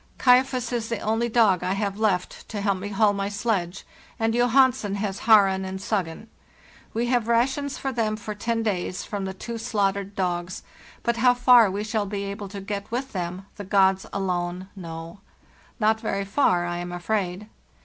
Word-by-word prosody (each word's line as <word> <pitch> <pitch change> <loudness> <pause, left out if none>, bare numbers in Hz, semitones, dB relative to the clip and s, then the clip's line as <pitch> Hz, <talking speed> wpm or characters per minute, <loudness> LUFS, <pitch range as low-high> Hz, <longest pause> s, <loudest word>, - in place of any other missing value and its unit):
"* - - -34
Kaifas' 250 -1 +3
is 230 -2 -2
the 230 - -1
only 225 +3 0
dog 215 -6 +4
I 185 +1 0
have 200 0 -2
left 200 -5 -1
to 210 - -4
help 200 -2 0
me 200 - -5
haul 205 +1 +3
my 200 0 -2
sledge, 200 -4 -2 0.3
and 225 0 +1
Johansen 245 -3 +3
has 200 -1 -3
' - - -10
Haren' 195 -3 +6
and 190 0 -5
'Suggen.' 195 -2 -3 0.7
We 230 +2 -1
have 240 -2 +1
rations 265 +4 +1
for 270 - -3
them 225 -3 0
for 215 0 -6
ten 225 +2 -2
days 185 -4 -2
from 200 -2 -4
the 190 - -4
two 230 +4 -6
slaugh 210 -4 +1
tered 200 0 -7
dogs, 180 -1 -2 0.4
but 235 0 0
how 245 +1 +4
far 245 -3 +6
we 200 +2 -3
shall 215 -1 -1
be 200 0 -3
able 200 +1 -5
to 200 0 -7
get 200 0 -5
with 260 +3 -3
them 180 0 -4
the 205 - -6
gods 190 -1 +3
alone 180 -1 -2
know. 165 0 -8 0.6
Not 220 0 +3
very 200 -2 -2
far, 195 -5 +2
I 175 0 -3
am 175 0 -5
afraid. 185 +2 -2
205 Hz, 190 wpm, -25 LUFS, 190-230 Hz, 0.7 s, Haren